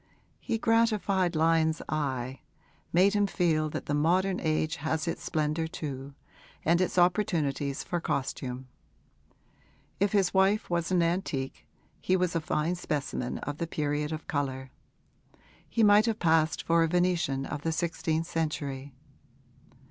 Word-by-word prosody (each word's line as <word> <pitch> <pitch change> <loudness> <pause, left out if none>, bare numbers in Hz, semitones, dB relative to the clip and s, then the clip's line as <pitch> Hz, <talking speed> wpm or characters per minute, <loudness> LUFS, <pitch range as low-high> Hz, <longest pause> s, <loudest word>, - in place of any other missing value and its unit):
He 225 - -2
gratified 215 -6 +2
Lyon's 160 0 +3
eye, 135 -3 -2 0.5
made 190 +4 +4
him 205 -1 +2
feel 160 -5 +1
that - - -5
the 145 - -2
modern 180 +6 +2
age 155 -1 0
has 160 +2 -2
its 165 - -2
splendour 155 +1 -1
too 140 -3 -6 0.5
and 170 +2 +3
its 185 - -1
opportunities 160 -7 +1
for 175 -1 -3
costume. 130 -3 -3 1.3
If 200 +1 +2
his 195 -3 +2
wife 195 +1 +2
was 170 0 0
an 180 -2 +3
antique 165 -6 -2 0.3
he 185 - +1
was 180 -1 0
a 165 - +1
fine 160 +2 0
specimen 145 -7 -3
of 145 0 -5
the 170 - -2
period 150 -1 -1
of 155 0 -5
colour: 130 -3 -3 1.0
he 230 - +1
might 210 +2 +6
have 225 -2 0
passed 160 -3 +2
for 165 0 +3
a 165 - +3
Venetian 170 -6 +1
of 150 0 -5
the 165 - -1
sixteenth 165 -1 -1
century. 145 -5 -3
160 Hz, 140 wpm, -29 LUFS, 145-180 Hz, 1.3 s, might